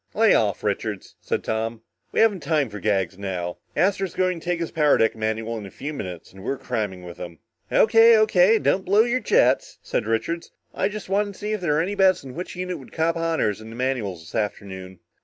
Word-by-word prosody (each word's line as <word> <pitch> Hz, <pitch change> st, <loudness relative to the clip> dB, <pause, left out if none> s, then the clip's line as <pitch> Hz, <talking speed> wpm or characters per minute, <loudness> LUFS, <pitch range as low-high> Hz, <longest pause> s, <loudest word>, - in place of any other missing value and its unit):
"Lay -, -, +5 dB
off, -, -, +1 dB
Richards," -, -, -3 dB
said -, -, -2 dB
Tom. 115 Hz, +1 st, -3 dB, 0.3 s
"We -, -, +2 dB
haven't 215 Hz, -4 st, +4 dB
time 145 Hz, -5 st, 0 dB
for 105 Hz, -, -6 dB
gags 95 Hz, -1 st, 0 dB
now. 90 Hz, -3 st, -4 dB, 0.2 s
Astro's 195 Hz, -1 st, +1 dB
going 185 Hz, -2 st, +1 dB
to -, -, -16 dB
take 175 Hz, -1 st, -1 dB
his 170 Hz, -, -3 dB
power 150 Hz, -3 st, +3 dB
deck 115 Hz, -, +2 dB
manual 110 Hz, +1 st, -2 dB
in 100 Hz, -, -8 dB
a -, -, -10 dB
few 145 Hz, +9 st, -6 dB
minutes 90 Hz, -, -7 dB
and 95 Hz, 0 st, -12 dB
we're 135 Hz, +5 st, -2 dB
cramming 105 Hz, -8 st, -3 dB
with 85 Hz, -1 st, -9 dB
him." 85 Hz, -2 st, -8 dB, 0.3 s
"O.K. 225 Hz, +1 st, +6 dB
O.K. 215 Hz, 0 st, +5 dB
don't 190 Hz, -2 st, +1 dB
blow 205 Hz, +3 st, +5 dB
your 240 Hz, +2 st, 0 dB
jets," 220 Hz, -, +2 dB
said -, -, -2 dB
Richards. 165 Hz, +10 st, -1 dB, 0.2 s
"I 195 Hz, -, 0 dB
just 210 Hz, 0 st, -7 dB
wanted 200 Hz, +1 st, 0 dB
to -, -, -16 dB
see 210 Hz, 0 st, -3 dB
if 210 Hz, -, -3 dB
there 160 Hz, -4 st, +1 dB
were 150 Hz, -, +2 dB
any 190 Hz, +5 st, -2 dB
bets 190 Hz, -5 st, +3 dB
on 130 Hz, -, -8 dB
which 180 Hz, +5 st, -6 dB
unit 180 Hz, 0 st, -4 dB
would -, -, -14 dB
cop 165 Hz, +1 st, 0 dB
honors 165 Hz, -11 st, 0 dB
in 110 Hz, -, -10 dB
the 115 Hz, -, -9 dB
manuals 120 Hz, -9 st, -2 dB
this 80 Hz, -, -14 dB
afternoon." 95 Hz, -3 st, -4 dB
145 Hz, 225 wpm, -24 LUFS, -, 0.3 s, O.K